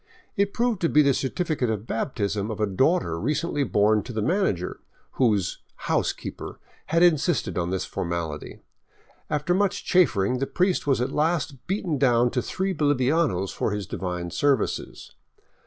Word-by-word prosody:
It 200 -2 +1
proved 235 -3 0
to 165 - +2
be 150 - +5
the 140 - +4
certifi 155 +5 -2
cate 125 - +1
of 110 -1 -2
baptism 105 -4 -2
of 110 - -5
a 105 - +2
daughter 100 - +1
recently 150 - 0
born 105 -3 +3
to 125 - -8
the 110 -2 -2
manager, 105 - 0 0.3
whose 105 -8 +1
" - - -39
housekeeper - - -2 0.2
" - - -31
had 165 +2 +3
insisted 170 -2 +2
on 85 -1 -1
this 95 0 -2
formality. 85 -3 -4 0.7
After 150 +4 0
much 195 +1 0
chaffering 125 - +3
the 135 - -1
priest 180 -4 0
was 135 -3 +2
at 125 - -1
last 150 -4 -1
beaten 180 -6 -1
down 120 -3 +3
to 125 - 0
three 190 +7 -2
bolivianos 145 - +1
for - - -1
his 105 -1 -3
divine 90 -2 -4
services. 140 - -1
130 Hz, 165 wpm, -25 LUFS, 105-165 Hz, 0.7 s, be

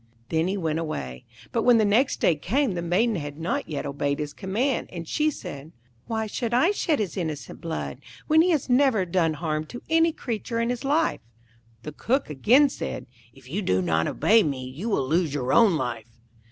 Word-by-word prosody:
Then 160 +1 +1
he 195 +2 -1
went 160 -3 -1
away; 65 - -5 0.3
but 230 - 0
when 245 0 +5
the 220 - +3
next 225 +7 +2
day 175 - +4
came 240 - 0
the 175 - -3
Maiden 195 +6 +1
had 145 -2 -6
not 165 +1 -2
yet 150 - -3
obeyed 140 0 -1
his 150 -1 -4
command, 230 +7 -1
and 170 -2 -7
she 305 - +1
said, 150 - -8 0.3
'Why 220 -1 -1
should 235 +2 -2
I 330 +10 +4
shed 330 -7 0
his 200 - -3
innocent 160 -5 -5
blood, 165 -1 -4 0.3
when 315 0 +5
he 355 - +3
has 310 -6 +1
never 250 -6 +3
done 170 -3 +1
harm 155 0 -2
to 240 - -9
any 325 0 +4
creature 230 -4 -4
in 230 +1 0
his 245 +1 -4
life?' 300 +4 +1 0.6
The 150 - -6
Cook 245 - -1
again 245 - +5
said, - - -5 0.3
'If 130 +1 -18
you 180 +10 -3
do 95 - +1
not 80 -3 +1
obey 225 +1 +4
me, 140 -8 -2
you 155 - -5
will 135 -11 0
lose 160 -1 +1
your 130 -2 -1
own 220 -7 +5
life.' 115 -5 -5
180 Hz, 205 wpm, -25 LUFS, 150-240 Hz, 0.6 s, when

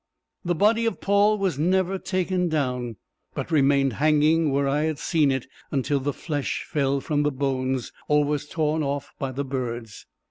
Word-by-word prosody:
The 175 0 0
body 220 +5 +3
of 225 - -2
Paul 205 +2 +3
was 190 -8 -1
never 185 +3 +1
taken 185 -1 -1
down, 125 -6 -1 0.4
but - - -4
remained 140 -3 +3
hanging 155 +3 +3
where 140 0 +1
I 145 +2 +1
had 155 -2 -1
seen 155 -2 +2
it 135 -2 -2 0.2
until 140 0 0
the 140 +2 -1
flesh 145 -1 -3
fell 140 -2 0
from 145 +1 0
the 150 - +2
bones, 130 -2 -1 0.2
or 150 0 +3
was 145 0 -2
torn 155 -1 0
off 140 -1 -3
by 135 -1 -2
the 140 +2 -3
birds. 120 -5 -5
145 Hz, 175 wpm, -25 LUFS, 135-165 Hz, 0.4 s, body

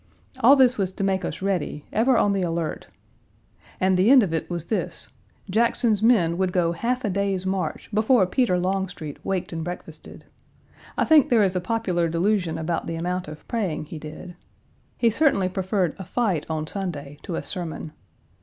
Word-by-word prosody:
All 260 +3 +7
this 255 -4 +4
was 190 -2 0
to 195 - -4
make 190 -1 0
us 180 - -5
ready, 180 -6 -2
ever 240 +3 +3
on 205 - +3
the 195 - 0
alert. 165 -2 -3 0.9
And 185 0 +3
the 190 +5 +4
end 265 -3 +8
of 175 -5 -2
it 160 - -2
was 170 -2 -4
this: 220 - -3 0.4
Jackson's 225 +1 +2
men 185 -7 +3
would 190 -1 +1
go 175 -2 +1
half 240 +9 -2
a - - 0
day's 195 -1 -1
march 190 0 -2
before 215 0 +4
Peter 185 -1 +1
Longstreet 180 -5 -3
waked 190 -3 -2
and 165 -1 -3
breakfasted. 175 +2 -9 0.7
I - - +2
think 310 -4 +5
there 230 -4 +4
is 190 -1 +1
a 180 - 0
popular 180 -4 0
delusion 175 0 0
about 165 +1 -2
the 165 - -3
amount 180 +2 -3
of 155 0 -10
praying 195 -10 -2
he 155 +1 -8
did. 155 +3 -9 0.6
He 230 -2 +3
certainly 225 -8 +2
preferred 185 -2 -1
a - - -5
fight 190 -6 -1
on 155 -1 -2
Sunday 150 -6 -5
to 175 - -5
a - - -3
sermon. 165 -4 -6
185 Hz, 180 wpm, -24 LUFS, 170-215 Hz, 0.9 s, end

